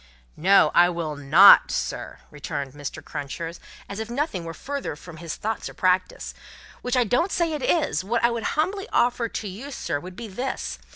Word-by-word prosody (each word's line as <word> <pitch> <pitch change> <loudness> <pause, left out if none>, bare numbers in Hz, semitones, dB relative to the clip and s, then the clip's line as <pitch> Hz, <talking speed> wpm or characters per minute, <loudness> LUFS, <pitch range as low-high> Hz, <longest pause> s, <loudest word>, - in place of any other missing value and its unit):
"No, 195 +5 +4
I 175 0 +6
will 165 -3 -3
not, 150 +8 +7
sir," - - -4
returned 140 -2 -5
Mr. 145 -1 -7
Crunches 165 +3 -6 0.3
as 200 +1 -6
if 220 0 -5
nothing 240 - -2
were 165 - -6
further 280 - -5
from 165 +2 -12
his 165 -1 -6
thoughts 220 +1 -4
or - - -13
practice 185 0 0 0.5
"which 250 +1 -1
I 250 - +5
don't 250 - +1
say 335 -2 0
it 300 - -3
is 250 - +1
wot 230 +4 -1
I 235 - +4
would 235 -1 -3 0.2
humbly 390 +7 -1
offer 240 -1 +1
to 215 - -5
you, 215 +9 -8
sir, 165 - -3
would 180 +3 -10
be 235 +2 -7
this. 245 +7 -4
200 Hz, 190 wpm, -24 LUFS, 165-250 Hz, 0.5 s, not